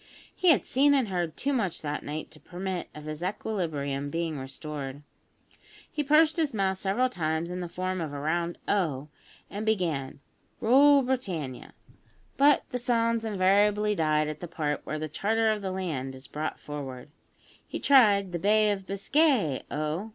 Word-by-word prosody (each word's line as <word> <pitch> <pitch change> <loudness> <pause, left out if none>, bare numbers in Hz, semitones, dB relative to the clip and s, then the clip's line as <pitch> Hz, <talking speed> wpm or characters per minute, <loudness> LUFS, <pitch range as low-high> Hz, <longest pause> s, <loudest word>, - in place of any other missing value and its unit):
He 370 - -1
had 310 - +4
seen 285 +2 +4
and 260 -6 +1
heard 175 -4 -2
too 280 +1 0
much 200 -12 -1
that 150 0 -3
night 155 +1 -6
to 155 - -13
permit 185 +1 -5
of 150 - -9
his 155 +1 -6
equilibrium 160 -8 -2
being 165 +1 -2
restored. 140 +1 -6 0.9
He 295 - -1
pursed 305 +2 +4
his 305 -7 0
mouth 190 -2 0
several 200 +7 +1
times 165 -5 -2
into 180 0 -4
the - - -18
form 185 0 -2
of 155 -3 -4
a 145 - -5
round 170 +3 -1
O, 155 -8 0 0.4
and 205 +2 -5
began 170 -13 -1 0.4
"Rule 275 +4 +6
Britannia"; 185 - -3 0.6
but 285 +1 +5
the 250 - -2
sounds 230 -1 +1
invariably 210 +1 +3
died 155 -4 +1
at 155 0 -5
the 175 - -6
part 150 -3 -2
where 155 - -2
the 155 0 -3
"charter 220 +8 +1
of 215 -1 -2
the 195 - -3
land" 155 -9 -3
is 130 +1 -10
brought 150 +3 -4
forward. 140 -3 -7 0.6
He - - -5
tried 205 -9 +5
"The 175 - -3
Bay 210 +3 +4
of 195 -2 -4
Biscay, 200 - +2
O!" 155 +8 -3
185 Hz, 170 wpm, -28 LUFS, 155-220 Hz, 0.9 s, Rule